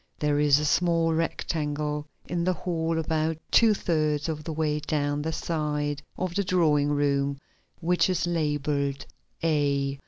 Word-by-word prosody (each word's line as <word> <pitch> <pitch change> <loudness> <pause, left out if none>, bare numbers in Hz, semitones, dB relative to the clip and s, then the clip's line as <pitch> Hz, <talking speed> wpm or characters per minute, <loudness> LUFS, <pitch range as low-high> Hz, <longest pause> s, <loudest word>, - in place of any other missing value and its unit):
There 145 -1 +1
is 145 -1 +5
a 150 - 0
small 165 0 +2
rectangle 150 -2 -2 0.2
in 170 0 -2
the 185 +1 +2
hall 165 -1 -2
about 160 0 0
two 225 -2 +5
thirds 155 -4 0
of 155 -1 -4
the 160 - -4
way 150 -1 0
down 145 -1 -1
the 160 +2 -2
side 150 -3 -2 0.2
of 185 -1 -2
the 200 - +1
drawing 155 -6 +2
room 140 -1 +1 0.4
which 175 +2 +2
is 180 -2 +1
labeled 145 -4 -1 0.4
A. 140 -3 +1
150 Hz, 150 wpm, -27 LUFS, 145-165 Hz, 0.4 s, is